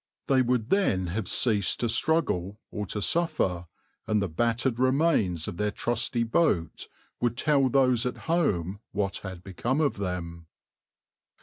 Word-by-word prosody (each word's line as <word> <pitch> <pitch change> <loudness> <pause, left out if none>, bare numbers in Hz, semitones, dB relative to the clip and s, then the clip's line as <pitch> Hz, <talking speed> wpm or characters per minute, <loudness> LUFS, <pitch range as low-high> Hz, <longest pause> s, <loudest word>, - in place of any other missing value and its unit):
They 135 -2 +3
would 125 -2 0
then 100 - +2
have 105 -2 -2
ceased 105 -4 +1
to 120 - +1
struggle 110 - 0
or 105 -2 -4
to 105 +1 -2
suffer, 155 - 0 0.4
and 110 -1 +2
the 100 - 0
battered 115 +7 0
remains 130 - +2
of 85 - -5
their 105 +2 0
trusty 120 +2 -1
boat 115 - 0 0.3
would 120 -1 0
tell 140 -4 +3
those 125 -3 +3
at 125 - -4
home 100 - 0
what 100 -1 -1
had 95 -2 -8
become 120 - -2
of 145 -7 +1
them. 85 -4 -5
115 Hz, 145 wpm, -27 LUFS, 95-130 Hz, 0.4 s, They